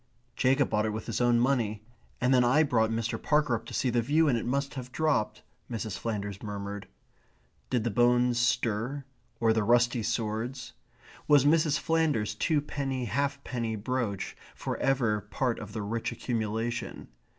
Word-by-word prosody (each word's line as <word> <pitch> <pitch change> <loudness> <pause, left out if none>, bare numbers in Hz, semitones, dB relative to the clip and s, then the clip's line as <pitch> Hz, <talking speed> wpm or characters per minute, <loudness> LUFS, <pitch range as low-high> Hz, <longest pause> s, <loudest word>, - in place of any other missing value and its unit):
"Jacob 130 +1 +2
bought 105 0 +1
it 105 - -2
with 110 - -5
his 115 +1 -2
own 120 -1 +4
money, 115 -5 0 0.3
and 125 +2 +3
then 125 -1 +5
I 130 +6 +4
brought 115 -6 +2
Mr. 115 0 -2
Parker 150 -4 +2
up 115 - -3
to - - -8
see 125 - +1
the 120 0 +2
view, 150 +7 +3
and 135 - +3
it 115 - -2
must 140 +3 -1
have 125 -3 -7
dropped 145 -5 0
" - - -22
Mrs. 110 -4 -3
Flanders 105 -3 -4
murmured. 100 -1 -5 0.8
Did 125 -4 +1
the 120 - -1
bones 120 +2 +3
stir, 120 +3 0 0.3
or 115 -1 +3
the 110 - +1
rusty 120 +2 +3
swords? 115 +3 -3 0.5
Was 145 -2 +6
Mrs. 155 -1 +4
Flanders's 150 -12 +1
twopenny 140 -1 -1
halfpenny 130 -3 -2
brooch 110 -3 -3 0.2
for - - -3
ever 120 -6 +1
part 120 +3 -2
of 105 -2 -8
the 110 -1 -4
rich 115 +3 -2
accumulation? 115 - -3
120 Hz, 165 wpm, -29 LUFS, 110-135 Hz, 0.8 s, Was